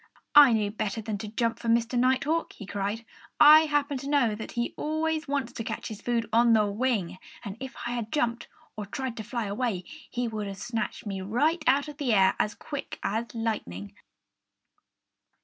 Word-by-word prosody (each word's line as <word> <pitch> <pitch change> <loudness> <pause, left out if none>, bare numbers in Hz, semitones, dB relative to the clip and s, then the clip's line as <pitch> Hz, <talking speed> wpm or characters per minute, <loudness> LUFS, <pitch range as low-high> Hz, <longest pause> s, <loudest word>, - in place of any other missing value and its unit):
"I 290 -3 +9
knew 210 -2 +1
better 215 0 -3
than 215 -2 -4
to 215 - -5
jump 230 +2 -1
for 235 - -6
Mr. 230 +1 +2
Nighthawk!" 260 +6 +1
he 205 - -10
cried. 205 +3 -3 0.3
"I 310 +2 +9
happened 290 -2 0
to 275 - -6
know 270 -7 +3
that 220 +1 -7
he 240 0 -2
always 315 +1 -1
wants 275 -3 -2
to 225 - -5
catch - - -5
his 215 -1 -8
food 235 -2 -1
on 235 0 +5
the 215 -1 +4
wing. 205 -4 -1 0.3
And 200 -1 -5
if 265 0 -7
I 240 - -2
had 235 -3 -4
jumped, 240 -5 -1 0.3
or 210 -2 -6
tried 260 +3 -4
to 220 - -4
fly 235 +1 -3
away, 205 -2 -2 0.3
he 245 0 -2
would 215 -2 -4
have 195 -1 -6
snatched 230 +1 -4
me 195 -2 -4
right 295 - +1
out 275 +3 +3
of 295 -1 -9
the 270 -7 0
air 190 -1 +5
as 210 - 0
quick 285 -2 -6
as 225 +3 -1
lightning." 100 - -3
235 Hz, 195 wpm, -27 LUFS, 210-265 Hz, 0.3 s, I